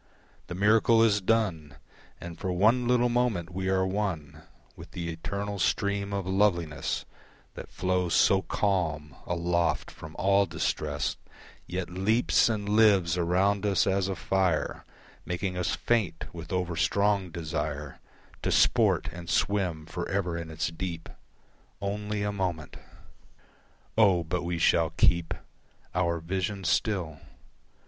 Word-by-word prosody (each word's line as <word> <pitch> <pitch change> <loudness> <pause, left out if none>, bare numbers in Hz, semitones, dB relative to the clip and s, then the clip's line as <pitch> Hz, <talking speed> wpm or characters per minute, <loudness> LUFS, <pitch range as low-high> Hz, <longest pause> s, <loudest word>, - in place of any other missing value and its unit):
The 90 - -6
miracle 110 +3 +4
is 105 -3 +3
done 95 -9 0 0.4
And 85 -1 -8
for 95 - -2
one 110 +7 +3
little 125 0 +3
moment 120 -8 0
we 95 +1 -2
are 95 0 +2
one 85 -7 -3 0.3
With - - -12
the 85 -1 -4
eternal 100 +5 -4
stream 100 +2 0
of 100 -2 -2
loveliness 85 -7 0 0.5
That - - -9
flows 90 -2 0
so 95 -1 +4
calm, 80 -7 -1
aloft 85 -3 0
from 80 +1 -11
all 100 +1 +3
distress 75 -3 -2 0.5
Yet 90 -1 -4
leaps 110 +7 +2
and 105 -2 -2
lives 100 -5 +4
around 95 +3 +1
us 100 -5 +2
as 95 0 +1
a 95 - -2
fire 90 +1 0 0.4
Making 90 +1 -3
us 90 -1 -1
faint 100 -9 0
with - - -8
overstrong 90 +2 +1
desire 75 -3 -4 0.4
To - - -1
sport - - +3
and 85 0 -9
swim 90 -7 0
for 85 +1 -5
ever 95 -3 -1
in 85 -1 -5
its 80 0 -2
deep 85 0 -5 0.7
Only 105 +1 -3
a 105 - -1
moment. 90 -7 -3 1.2
O! 95 -6 +4
but 85 +2 -2
we 85 0 -2
shall 80 0 +3
keep 85 +1 +2 0.6
Our 85 -1 0
vision 95 +4 -3
still. 85 -3 0
90 Hz, 130 wpm, -28 LUFS, 85-100 Hz, 1.2 s, miracle